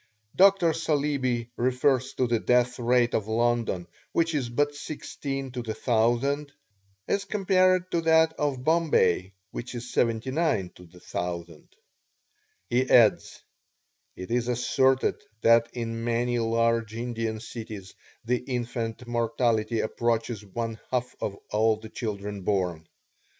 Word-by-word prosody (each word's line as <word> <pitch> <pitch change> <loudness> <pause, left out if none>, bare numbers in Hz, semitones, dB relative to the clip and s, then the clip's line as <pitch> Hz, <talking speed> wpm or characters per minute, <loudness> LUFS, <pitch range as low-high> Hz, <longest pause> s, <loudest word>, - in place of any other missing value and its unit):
Dr. 190 -3 +5
Saleeby 140 -7 -1
refers 130 +1 +1
to 130 - +1
the 120 -1 +1
death 125 +1 +2
rate 120 0 +2
of 105 - 0
London, 115 -5 0 0.3
which 165 0 +1
is 135 -5 -1
but 145 +4 +1
16 140 -2 -5
to 125 0 -4
the 110 -2 -4
1000, 120 +6 +1 0.6
as 200 - 0
compared 185 -2 +2
to 170 - +1
that 160 0 +4
of 140 -5 -2
Bombay, 130 - +2 0.2
which 125 +1 -6
is 120 +1 -7
79 120 - 0
to 90 - -15
the 85 +2 -18
1000. 85 -2 -5 1.0
He 125 +2 +1
adds: 115 -4 +4 0.7
"It 90 +4 -8
is 120 0 +1
asserted 130 +2 +2 0.2
that 115 0 +5
in 115 -1 -4
many 120 +1 0
large 115 -1 +1
Indian 115 -2 -3
cities 110 -4 -8 0.3
the 125 +2 +2
infant 120 -2 -4
mortality 115 -1 0
approaches 115 -1 -1
one 115 +2 -4
half 125 0 -2
of 100 -1 -3
all 110 +1 +3
the 110 0 -11
children 105 -3 -5
born. 90 -5 -1
120 Hz, 130 wpm, -27 LUFS, 110-135 Hz, 1.0 s, Dr